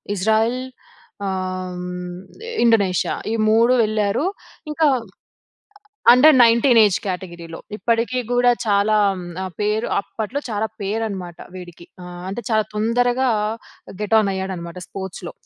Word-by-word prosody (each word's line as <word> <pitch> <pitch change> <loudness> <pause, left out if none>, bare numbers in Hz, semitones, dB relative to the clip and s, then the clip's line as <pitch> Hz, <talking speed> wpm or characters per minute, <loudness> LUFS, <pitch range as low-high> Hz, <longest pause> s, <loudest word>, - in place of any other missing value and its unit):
Israel 220 +5 +1 0.7
ఆహ్, 185 -1 -4 0.8
Indonesia 200 -6 +2 0.2
ఈ - - 0 0.2
3 230 +3 +4
వెళ్లారు. 215 +5 0 0.4
ఇంకా 310 +1 +1 1.3
అండర్ 275 +5 +7
19 235 +1 +5
ఏజ్ 205 -3 +3
కేటగిరీలో. 170 -3 -6 0.2
ఇప్పటికి 230 +3 0
కూడా 245 0 +4
చాలా 210 0 +2 0.6
పేరు 210 +2 0
అప్పట్లో 220 +6 -4
చాలా 215 -2 -1 0.2
పేరునమాట 195 -4 -3 0.2
వీడికి 175 -2 -11 0.2
ఆహ్, 175 0 -9
అంటే 200 +5 -4
చాలా 215 -1 +2
తొందరగా 245 +4 +1 0.7
గెట్ 210 +1 -2
ఆన్ 210 -2 +1
అయ్యాడనమాట 185 -2 -5
స్పోర్ట్స్‌లో. 190 -2 -7
210 Hz, 105 wpm, -21 LUFS, 185-230 Hz, 1.3 s, అండర్